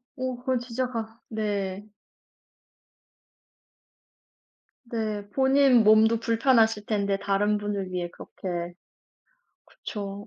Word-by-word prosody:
어 255 -2 -3
그건 255 0 -1
진짜 245 +1 -3
가 225 -1 -6
네. 205 -2 -3 3.0
네. 215 -3 -4
본인 265 -2 +4
몸도 220 +1 +5
불편하실 225 -2 +2
텐데 200 -2 0
다른 200 +1 +1
분을 205 -2 -3
위해 175 -1 -2
그렇게 175 -2 -6 0.9
그쵸. 200 -1 -7
215 Hz, 170 characters per minute, -26 LUFS, 200-235 Hz, 3.0 s, 몸도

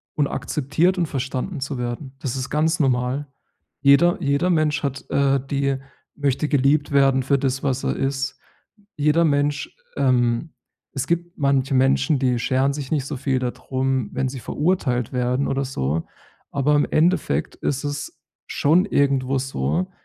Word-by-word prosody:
und 145 - +2
akzeptiert 155 +9 0
und 175 - +1
verstanden 140 +3 -3
zu 140 0 -4
werden. 125 +3 -5
Das 135 -3 -3
ist 130 0 -4
ganz 160 +3 +1
normal. 130 0 0 0.5
Jeder 140 +5 +5
jeder 140 +4 +1
Mensch 155 -3 +2
hat, 135 -2 -3
äh, 140 -1 +3
die 140 -1 0 0.4
möchte 145 +1 0
geliebt 145 +1 +2
werden 135 -1 +4
für 140 +2 +2
das, 135 -1 -1
was 135 -2 -1
er - - 0
ist. 135 0 -2 0.6
Jeder 150 +3 +3
Mensch, 145 -1 0 0.2
ähm 125 +1 +1 0.4
es 135 - -2
gibt 170 +1 -2
manche 140 -2 +1
Menschen, 135 +2 +3
die 125 -2 +1
scheren 130 +3 +1
sich 140 -2 -6
nicht 140 -4 0
so 145 - -4
viel 135 0 0
dadrum, 130 0 -2
wenn 130 0 -1
sie 130 0 -7
verurteilt 130 - -1
werden 125 +2 0
oder 135 0 0
so. 80 - -2 0.5
Aber 140 +2 +2
im 145 - +3
Endeffekt 170 +2 +1
ist 140 0 -2
es 145 0 -5 0.3
schon 165 +6 +3
irgendwo 135 -5 +1
so, 165 +7 -1
140 Hz, 155 wpm, -22 LUFS, 130-150 Hz, 0.6 s, Jeder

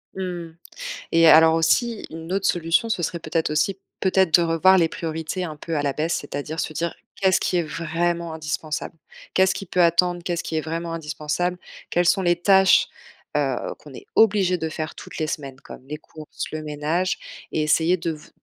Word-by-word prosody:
Mmh. 175 -3 -5 0.6
Et 165 0 +6
alors 160 +1 +7
aussi 225 +8 +1
une 165 +3 -7
autre 195 0 +1
solution, 170 +6 +1
ce 220 - -1
serait 170 +1 -2
peut-être 160 0 -1
aussi 185 +6 0 0.2
peut-être 190 -3 +2
de 175 - +7
revoir 170 +3 +4
les 165 -3 +4
priorités 160 +3 -4
un 155 -3 -5
peu 165 +2 -4
à 145 - +1
la 140 -2 0
baisse. 160 +4 -1
C'est-à-dire 145 +2 -5
se 155 - -2
dire: 170 +2 -2 0.2
«Qu'est-ce 190 -1 +3
qui 180 - 0
est 175 - +1
vraiment 170 +1 -2
indispensable? 155 +1 -4 0.4
Qu'est-ce 190 0 +4
qui 195 - -5
peut 180 0 +1
attendre? 175 +1 +3
Qu'est-ce 175 -2 -2
qui 160 - -4
est 155 - +1
vraiment 165 +1 -4
indispensable? 160 +3 -2 0.3
Quelles 175 0 +2
sont 195 +1 +4
les 175 -1 +3
tâches, 190 0 +5 0.5
heu, - - +1 0.2
qu'on - - -14
est 400 - -11
obligés 195 -4 +4
de 160 -1 -3
faire 155 -1 -5
toutes - - -10
les 155 - -1
semaines 135 -4 -5
comme 130 - -12
les 150 +1 -5
courses, 155 0 -8
le 155 0 -4
ménage?», 155 +5 -1 0.3
et 155 - 0
essayer 160 +4 +3
de 165 0 -2
v 150 -1 -10
165 Hz, 195 wpm, -23 LUFS, 155-180 Hz, 0.6 s, alors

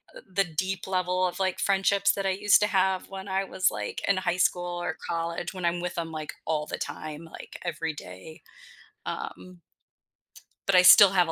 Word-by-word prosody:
uh, - - -10
the 195 +1 +1
deep 185 +3 -3
level 185 0 0
of, 180 - -6
like, 190 -1 0
friendships 200 0 +3
that 195 - -3
I - - +2
used 205 +2 +4
to 210 - +3
have 190 -2 +1
when 195 0 -8
I 190 0 0
was, 185 -1 +1
like, - - -5
in 200 - +3
high 180 -1 -1
school 175 -1 0
or 175 -2 -2
college 170 +2 -3
when 185 -2 -5
I'm 170 +1 +1
with 180 0 -4
'em, 165 -1 -3
like, 155 -1 -5
all 155 -1 -1
the - - -5
time, 155 +1 -6
like, 165 - -11
every 165 -2 -3
day. 150 - -11 0.6
Um. 90 -1 -7 1.1
But 195 - +3
I 180 - +8
still 185 +2 +9
have 180 -3 +3
a - - -2
180 Hz, 200 wpm, -27 LUFS, 165-190 Hz, 1.1 s, still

